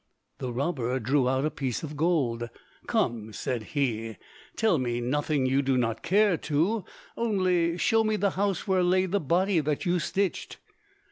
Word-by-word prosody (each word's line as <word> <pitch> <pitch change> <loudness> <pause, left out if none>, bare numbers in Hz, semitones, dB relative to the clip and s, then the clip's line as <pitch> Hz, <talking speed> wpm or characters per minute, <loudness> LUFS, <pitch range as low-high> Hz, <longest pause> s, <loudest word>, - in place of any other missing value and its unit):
The 125 - -3
robber 130 -1 -1
drew 130 +2 +2
out 130 +2 +1
a 155 - 0
piece 130 -1 -3
of 150 -1 -6
gold. 140 -8 0 0.4
"Come," 110 -2 -1
said 125 +1 -3
he, 115 -5 -1 0.4
"tell 215 -8 +2
me 120 -2 -1
nothing 145 +3 0
you 135 +2 +2
do 135 -1 +1
not 115 -2 -1
care 195 +1 +3
to; 170 +10 0 0.3
only 185 -6 +1
show 225 +8 +3
me 215 0 +1
the 205 -2 +1
house 195 -2 -1
where 190 -1 +3
lay 185 +1 +3
the 195 +2 0
body 180 +4 +2
that 150 +2 -1
you 180 0 +2
stitched." 190 +4 -2
150 Hz, 165 wpm, -27 LUFS, 130-185 Hz, 0.4 s, care